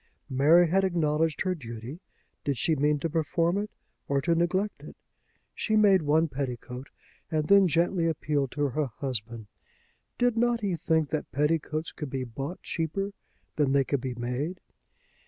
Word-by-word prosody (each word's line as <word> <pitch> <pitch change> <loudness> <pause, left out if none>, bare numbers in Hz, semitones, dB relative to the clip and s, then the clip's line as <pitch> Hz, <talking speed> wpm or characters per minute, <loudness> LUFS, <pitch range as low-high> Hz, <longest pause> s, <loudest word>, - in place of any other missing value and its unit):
Mary 155 +7 +5
had 190 +4 +2
acknowledged 160 -3 +1
her 185 -1 +1
duty. 120 -1 -8 0.4
Did 140 -3 -1
she 160 - +2
mean 150 +1 +2
to 165 - 0
perform 165 +3 +1
it, 210 +1 -3 0.4
or 140 0 +1
to 170 +4 +2
neglect 185 +5 0
it? - - -11 0.6
She 215 - -1
made 200 -4 +5
one 155 +2 +3
petticoat, 125 -2 -5 0.4
and 155 -1 0
then 200 -1 +6
gently 170 +1 +2
appealed 150 -3 0
to 145 -1 0
her 145 +3 -1
husband. 115 -3 -5 0.7
Did 245 -2 +2
not 240 0 +2
he 195 -4 0
think 160 -2 +1
that 155 - -3
petticoats 155 +2 0
could 150 -4 -6
be 130 0 -3
bought 135 +8 -6
cheaper 185 +5 -2 0.5
than 145 -3 +2
they 140 -1 +4
could 140 0 -1
be 125 -1 -4
made? 125 +9 -3
155 Hz, 160 wpm, -28 LUFS, 140-175 Hz, 0.7 s, then